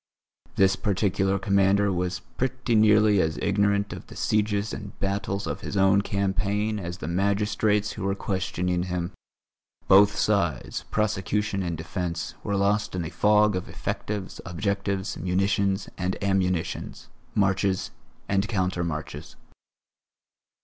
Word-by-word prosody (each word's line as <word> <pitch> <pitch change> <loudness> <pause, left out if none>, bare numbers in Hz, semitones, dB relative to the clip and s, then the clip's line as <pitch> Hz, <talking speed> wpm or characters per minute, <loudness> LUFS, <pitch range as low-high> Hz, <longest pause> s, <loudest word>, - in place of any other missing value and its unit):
This 95 0 +4
particular 95 -1 +1
commander 100 +1 +3
was 90 0 -2
pretty 130 -1 -1
nearly 105 -2 +5
as 80 0 -1
ignorant 100 0 +1
of - - -9
the - - -12
sieges 105 0 0
and - - -8
battles 100 0 -2
of - - -4
his 100 - -4
own 95 +1 +5
campaign 100 +2 -1
as 85 -1 -5
the 80 - -6
magistrates 105 +3 +1
who 105 - -6
were 100 0 0
questioning 90 -2 -1
him; 90 0 -3 0.8
both 100 +2 +6
sides, 85 - 0
prosecution 105 0 0
and 85 -3 -2
defence, 85 0 -4
were 100 - -1
lost 100 0 +1
in 90 -2 -2
a 80 - -6
fog 105 +3 +4
of 90 - -4
effectives, 100 -3 -4
objectives, 100 +2 -2
munitions 95 +2 0
and 90 +1 -1
ammunitions, 95 -4 -1 0.3
marches 95 -1 +1 0.4
and 100 +1 +1
counter 90 -5 0
marches. 80 -2 -5
100 Hz, 130 wpm, -26 LUFS, 90-105 Hz, 0.8 s, both